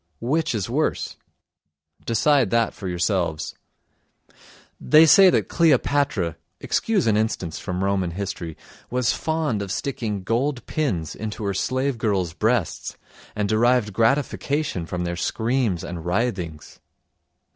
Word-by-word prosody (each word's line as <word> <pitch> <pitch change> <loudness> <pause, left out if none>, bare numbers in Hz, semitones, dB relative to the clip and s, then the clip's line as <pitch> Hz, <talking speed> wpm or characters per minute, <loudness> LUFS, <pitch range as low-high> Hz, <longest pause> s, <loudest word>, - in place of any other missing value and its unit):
Which 145 +2 0
is 100 -3 -2
worse? 145 +7 -1 0.9
Decide 130 +1 +3
that 115 0 +1
for 95 - -7
yourselves. 90 -3 -1 1.3
They 155 +1 +6
say 190 +4 +8
that - - +1
Cleopatra 140 - +2 0.2
(excuse 220 -5 0
an 110 -2 +3
instance 105 -6 -1
from 90 +1 -3
Roman 95 -2 0
history) 85 -3 -5 0.3
was 125 -1 +1
fond 160 -9 -1
of 100 -2 -4
sticking 110 -6 -3
gold 125 +5 -1
pins 90 - -2
into 110 0 -5
her 100 -1 -1
slave 130 +5 -1
girls' 95 -7 0
breasts 110 +2 -1 0.4
and 105 -1 0
derived 110 0 +2
gratification 135 - 0
from 90 +1 -3
their 85 0 -2
screams 115 -2 -1
and 85 -2 -6
writhings. 90 - -3
110 Hz, 125 wpm, -23 LUFS, 90-130 Hz, 1.3 s, say